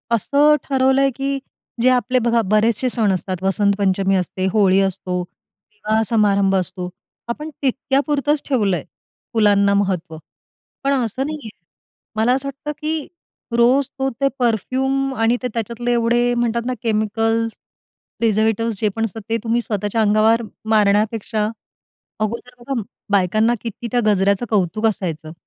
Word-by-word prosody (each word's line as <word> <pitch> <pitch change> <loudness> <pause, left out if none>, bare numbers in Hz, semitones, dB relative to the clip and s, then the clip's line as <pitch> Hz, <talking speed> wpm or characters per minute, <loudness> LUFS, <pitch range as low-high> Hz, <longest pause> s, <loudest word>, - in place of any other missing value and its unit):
असं 290 +7 +4
ठरवलंय 265 0 +3
की 275 +1 -1 0.4
जे 255 - +5
आपले 255 0 +2
बघा 235 -1 +2
बरेचसे 225 +3 +2
सण 220 -5 +1
असतात, 185 0 -3
वसंतपंचमी 195 -1 +2
असते, 185 0 -2
होळी 195 -3 +4
असतो, 185 -1 -2
विवाह 220 - -5
समारंभ 200 -3 +2
असतो 180 -1 -2 0.4
आपण 300 +6 -4
तितक्या 270 +1 +1
पुरतच 295 0 +1
ठेवलंय 200 - +1 0.5
फुलांना 205 -2 +4
महत्त्व. 185 -5 -1 0.7
पण 275 0 +2
असं 255 0 -1
नाहीये. 300 -7 -6 0.7
मला 225 +3 +3
असं 270 +1 -1
वाटतं 275 +2 -5
की 310 -1 -2 0.5
रोज 250 +3 +4
तो 270 - +1
ते 275 - +4
परफ्यूम 265 +4 0
आणि 225 +1 +2
ते - - +1
त्याच्यातले 235 +1 -2
एवढे 240 +1 +2
म्हणतात 235 -1 0
ना 255 - -1
केमिकल्स, 225 +1 0 0.7
प्रिझर्वेटिव्स 225 -1 +1
जे 215 - +2
पण 225 0 0
असतात 225 +1 -6
ते 230 - +1
तुम्ही 235 +1 +1
स्वतःच्या 210 0 -1
अंगावर 215 +2 +3 0.3
मारण्यापेक्षा 215 0 +2 0.7
अगोदर 235 +4 -3
बघा 240 -1 -3 0.3
बायकांना 210 +4 +3
किती 235 +1 -6
त्या 245 - +2
गजऱ्याचं 200 +1 +2
कौतुक 210 +1 0
असायचं. 165 -7 -3
225 Hz, 135 wpm, -20 LUFS, 200-250 Hz, 0.7 s, जे